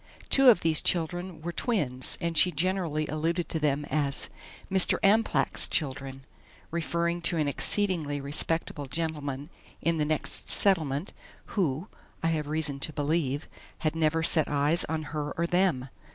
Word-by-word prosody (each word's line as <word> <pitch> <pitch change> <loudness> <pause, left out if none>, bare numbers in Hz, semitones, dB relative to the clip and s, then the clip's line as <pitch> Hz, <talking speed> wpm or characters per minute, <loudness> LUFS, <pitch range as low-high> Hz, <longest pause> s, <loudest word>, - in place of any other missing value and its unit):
Two 270 -1 +7
of 215 -7 +5
these 160 -1 +3
children 175 0 0
were 170 - -3
twins, 150 - -1
and 170 -2 -2
she 180 +3 +4
generally 170 -2 -1
alluded 165 +3 -1
to 160 - -2
them 145 -1 0
as 140 -3 -1 0.4
"Mr. 190 -1 +2
Amplach's 195 - +3
children," 135 -2 -3 0.5
referring 170 +1 -1
to 170 0 0
an 155 -2 +1
exceedingly 160 -2 +1
respectable 145 +1 0
gentleman 150 -1 -4 0.3
in 165 0 0
the 150 - +2
next 155 0 -1
settlement 160 -4 +2 0.4
who, 170 -2 0 0.4
I 165 - +2
have 155 -3 -1
reason 150 -2 -2
to 155 - -3
believe, 145 -1 -1 0.3
had 155 0 0
never 160 0 +1
set 160 -2 +3
eyes 150 +4 +1
on 160 -1 -3
her 150 -1 -3
or 170 - +1
them. 175 -7 +1
160 Hz, 150 wpm, -28 LUFS, 145-170 Hz, 0.5 s, Two